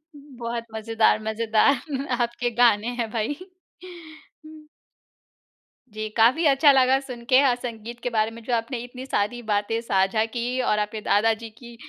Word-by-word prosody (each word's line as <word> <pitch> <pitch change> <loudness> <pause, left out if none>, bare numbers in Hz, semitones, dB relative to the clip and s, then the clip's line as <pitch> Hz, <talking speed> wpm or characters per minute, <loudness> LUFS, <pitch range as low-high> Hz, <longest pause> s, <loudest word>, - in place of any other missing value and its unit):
बहुत 240 -5 -6
मज़ेदार 220 0 +1
मज़ेदार 230 +6 0
आपके 240 +1 -1
गाने 225 -2 +4
हैं 225 -2 -1
भई। 230 +6 -2 2.6
जी, 215 0 -4
काफ़ी 255 +9 +4
अच्छा 285 +1 +6
लगा 265 0 +4
सुन 250 -4 -9
के 255 - +6
अ, 265 -3 +3
संगीत 235 -1 -8
के 245 - -3
बारे 220 -1 0
में 230 +1 -11
जो 245 - -3
आपने 235 +2 -3
इतनी 250 +1 -9
सारी 240 0 -1
बातें 210 +1 -1
साझा 195 0 +1
की 240 +2 -3
और 210 -3 +1
आपके 210 +1 -3
दादा 220 +3 +2
जी 225 +1 -9
की 235 -1 -12
235 Hz, 150 wpm, -24 LUFS, 220-255 Hz, 2.6 s, अच्छा